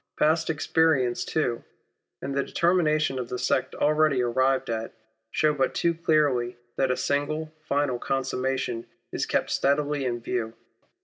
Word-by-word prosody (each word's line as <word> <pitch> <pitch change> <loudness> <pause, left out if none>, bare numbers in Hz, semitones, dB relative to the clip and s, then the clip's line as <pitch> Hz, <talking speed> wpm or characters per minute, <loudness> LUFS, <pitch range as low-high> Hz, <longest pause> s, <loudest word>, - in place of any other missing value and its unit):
Past 160 +2 +2
experience 155 -5 +2
too, 125 -7 -1 0.6
and 135 - -3
the 140 - +1
determinations 155 -6 +1
of 125 - -5
the 125 - -3
sect 130 - 0
already 150 -3 +2
arrived 130 +2 +1
at, 115 -1 -3 0.4
show 150 +5 +2
but 135 -2 0
too 170 - +2
clearly 145 -7 +1 0.2
that 135 - +1
a 125 - +1
single 155 +2 -1
final 140 -4 0
consummation 130 -2 -2 0.2
is - - -2
kept - - 0
steadily 145 0 +1
in 120 -1 -1
view. 115 -1 -3
135 Hz, 140 wpm, -26 LUFS, 125-155 Hz, 0.6 s, Past